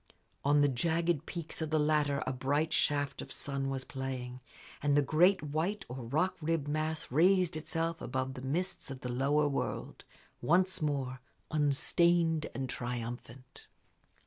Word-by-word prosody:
On 145 Hz, +1 st, +4 dB
the 145 Hz, -, +5 dB
jagged 165 Hz, +3 st, 0 dB
peaks 170 Hz, -2 st, -6 dB
of 160 Hz, -, -1 dB
the 155 Hz, -, +2 dB
latter 150 Hz, -2 st, +2 dB
a 130 Hz, -, -1 dB
bright 145 Hz, +5 st, 0 dB
shaft 145 Hz, -1 st, +1 dB
of -, -, -9 dB
sun 140 Hz, -1 st, -3 dB
was 135 Hz, -1 st, -3 dB
playing, 130 Hz, -2 st, -5 dB, 0.4 s
and 145 Hz, 0 st, +3 dB
the 145 Hz, -, +5 dB
great 175 Hz, +5 st, +4 dB
white 160 Hz, +8 st, -2 dB
or 125 Hz, 0 st, -6 dB
rock 155 Hz, +9 st, +1 dB
ribbed 155 Hz, -2 st, 0 dB
mass 155 Hz, 0 st, -2 dB
raised 180 Hz, +3 st, +4 dB
itself 165 Hz, +1 st, -2 dB
above 130 Hz, 0 st, -2 dB
the 130 Hz, -, -8 dB
mists 175 Hz, +8 st, -2 dB
of 130 Hz, -1 st, -7 dB
the 125 Hz, -, -4 dB
lower 140 Hz, +4 st, +2 dB
world, 140 Hz, -, -3 dB, 0.4 s
once 185 Hz, +2 st, +2 dB
more 135 Hz, -4 st, -1 dB, 0.3 s
unstained 160 Hz, +2 st, +3 dB
and 130 Hz, +1 st, -2 dB
triumphant. 120 Hz, +1 st, -6 dB
145 Hz, 150 wpm, -32 LUFS, 135-165 Hz, 0.4 s, the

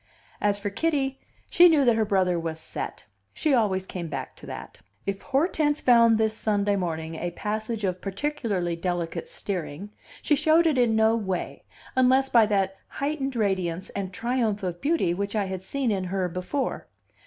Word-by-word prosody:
As 205 Hz, -1 st, +2 dB
for 205 Hz, 0 st, -4 dB
Kitty, 270 Hz, +2 st, 0 dB, 0.3 s
she 355 Hz, 0 st, +7 dB
knew 300 Hz, -4 st, +4 dB
that 240 Hz, -2 st, +5 dB
her 220 Hz, -1 st, +2 dB
brother 185 Hz, -4 st, +2 dB
was 165 Hz, -1 st, -4 dB
"set"; -, -, -6 dB, 0.3 s
she 305 Hz, -, +1 dB
always 200 Hz, -6 st, +2 dB
came 180 Hz, -3 st, -5 dB
back 155 Hz, -, -5 dB
to -, -, -12 dB
that. -, -, -8 dB, 0.3 s
If 195 Hz, 0 st, -3 dB
Hortense 295 Hz, +1 st, +1 dB
found 230 Hz, -2 st, +5 dB
this 220 Hz, 0 st, +1 dB
Sunday 205 Hz, -2 st, +1 dB
morning 165 Hz, -4 st, -3 dB
a 175 Hz, +2 st, -3 dB
passage 215 Hz, +4 st, -3 dB
of 185 Hz, -2 st, -1 dB
particularly 200 Hz, -, -2 dB
delicate 175 Hz, -, -3 dB
steering, 195 Hz, -, -5 dB, 0.3 s
she -, -, +2 dB
showed 315 Hz, +3 st, +4 dB
it 300 Hz, -5 st, +3 dB
in 235 Hz, -3 st, +3 dB
no 220 Hz, +1 st, +4 dB
way, 190 Hz, -5 st, -3 dB, 0.3 s
unless 260 Hz, +1 st, +4 dB
by 230 Hz, -4 st, +5 dB
that 195 Hz, -2 st, 0 dB
heightened 275 Hz, -2 st, -3 dB
radiance 190 Hz, -4 st, -1 dB
and 195 Hz, -2 st, -4 dB
triumph 225 Hz, -2 st, -1 dB
of 175 Hz, -2 st, -3 dB
beauty 300 Hz, -, +1 dB
which 200 Hz, +3 st, -3 dB
I 205 Hz, -2 st, +1 dB
had 190 Hz, -1 st, -4 dB
seen 255 Hz, +5 st, -1 dB
in 190 Hz, -2 st, -1 dB
her 185 Hz, 0 st, -1 dB
before. 185 Hz, +10 st, -3 dB
210 Hz, 175 wpm, -26 LUFS, 185-260 Hz, 0.3 s, she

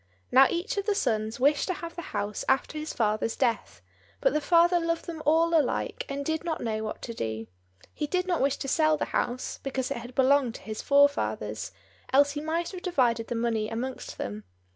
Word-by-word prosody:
Now 265 Hz, +1 st, +8 dB
each 350 Hz, +5 st, -2 dB
of 400 Hz, +1 st, -2 dB
the 415 Hz, -, +2 dB
sons 220 Hz, -, -1 dB
wished 285 Hz, +3 st, +3 dB
to 370 Hz, -, -1 dB
have 335 Hz, 0 st, -7 dB
the 345 Hz, -, -5 dB
house 210 Hz, -, -3 dB
after 265 Hz, +3 st, +1 dB
his 305 Hz, +1 st, -4 dB
father's 215 Hz, 0 st, 0 dB
death; 240 Hz, -4 st, -1 dB, 0.4 s
but -, -, +2 dB
the 305 Hz, -, +1 dB
father 345 Hz, +2 st, +4 dB
loved 335 Hz, 0 st, -1 dB
them 325 Hz, -2 st, -6 dB
all 330 Hz, +2 st, +4 dB
alike, 300 Hz, -6 st, 0 dB
and 280 Hz, 0 st, -3 dB
did 315 Hz, +1 st, -1 dB
not 330 Hz, -2 st, -2 dB
know 220 Hz, -2 st, -2 dB
what 215 Hz, -, -5 dB
to 235 Hz, -, -5 dB
do; 110 Hz, -, -4 dB, 0.5 s
he 295 Hz, -, -3 dB
did 365 Hz, +4 st, 0 dB
not 355 Hz, -3 st, 0 dB
wish 275 Hz, +1 st, +2 dB
to -, -, -5 dB
sell 310 Hz, +2 st, +3 dB
the -, -, -1 dB
house, 245 Hz, +1 st, -2 dB
because 265 Hz, -1 st, -3 dB
it 280 Hz, -, -1 dB
had 240 Hz, +2 st, -9 dB
belonged 265 Hz, -2 st, +3 dB
to -, -, -9 dB
his 215 Hz, -1 st, -5 dB
forefathers, 285 Hz, +1 st, +2 dB, 0.4 s
else 285 Hz, +2 st, +5 dB
he 295 Hz, 0 st, -4 dB
might 330 Hz, +2 st, -2 dB
have 365 Hz, -2 st, -7 dB
divided 245 Hz, -11 st, +1 dB
the 240 Hz, -, -3 dB
money 225 Hz, -2 st, 0 dB
amongst 250 Hz, +3 st, -5 dB
them. 105 Hz, +1 st, -5 dB
280 Hz, 210 wpm, -28 LUFS, 235-330 Hz, 0.5 s, Now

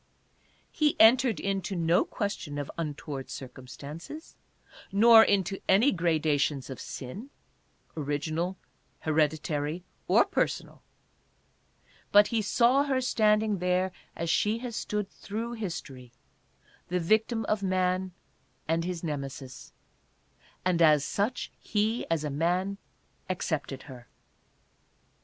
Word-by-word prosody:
He 300 Hz, -2 st, +1 dB
entered 235 Hz, -, +6 dB
into 195 Hz, 0 st, -2 dB
no 170 Hz, 0 st, +2 dB
ques 205 Hz, -1 st, -2 dB
tion 145 Hz, -2 st, -7 dB
of 145 Hz, -1 st, -4 dB
untoward 150 Hz, -4 st, -5 dB
circumstances, 140 Hz, -, -9 dB, 0.6 s
nor 225 Hz, +3 st, +8 dB
into 195 Hz, -1 st, +1 dB
any 215 Hz, +9 st, +5 dB
gradations 155 Hz, -5 st, 0 dB
of 130 Hz, -, -7 dB
sin 190 Hz, -, -7 dB, 0.3 s
— -, -, -39 dB
original, 155 Hz, +5 st, -2 dB, 0.4 s
hereditary 155 Hz, +1 st, 0 dB, 0.2 s
or -, -, +5 dB
personal -, -, -2 dB, 0.7 s
— -, -, -34 dB
but 205 Hz, 0 st, +7 dB
he 230 Hz, -2 st, +1 dB
saw 245 Hz, +6 st, +3 dB
her 270 Hz, -2 st, +1 dB
standing 215 Hz, -4 st, +2 dB
there 180 Hz, +1 st, +1 dB, 0.2 s
as 170 Hz, -, -3 dB
she 210 Hz, +6 st, +2 dB
has 235 Hz, -1 st, -6 dB
stood 210 Hz, -2 st, -2 dB
through 225 Hz, +4 st, -6 dB
history, 150 Hz, -, -6 dB, 0.8 s
the 180 Hz, +1 st, 0 dB
victim 220 Hz, +5 st, +1 dB
of 215 Hz, -1 st, 0 dB
man, 185 Hz, -1 st, 0 dB, 0.6 s
and 165 Hz, +1 st, +1 dB
his 175 Hz, -1 st, -4 dB
Nemesis; 135 Hz, -4 st, -6 dB, 0.9 s
and 180 Hz, -2 st, +2 dB
as 150 Hz, -3 st, +5 dB
such 215 Hz, +5 st, -2 dB
he, 215 Hz, +3 st, -1 dB
as 165 Hz, -2 st, 0 dB
a 150 Hz, -, -2 dB
man, 180 Hz, +6 st, 0 dB, 0.5 s
accepted 150 Hz, -7 st, -3 dB
her. 125 Hz, -4 st, -12 dB
180 Hz, 115 wpm, -28 LUFS, 150-210 Hz, 0.9 s, nor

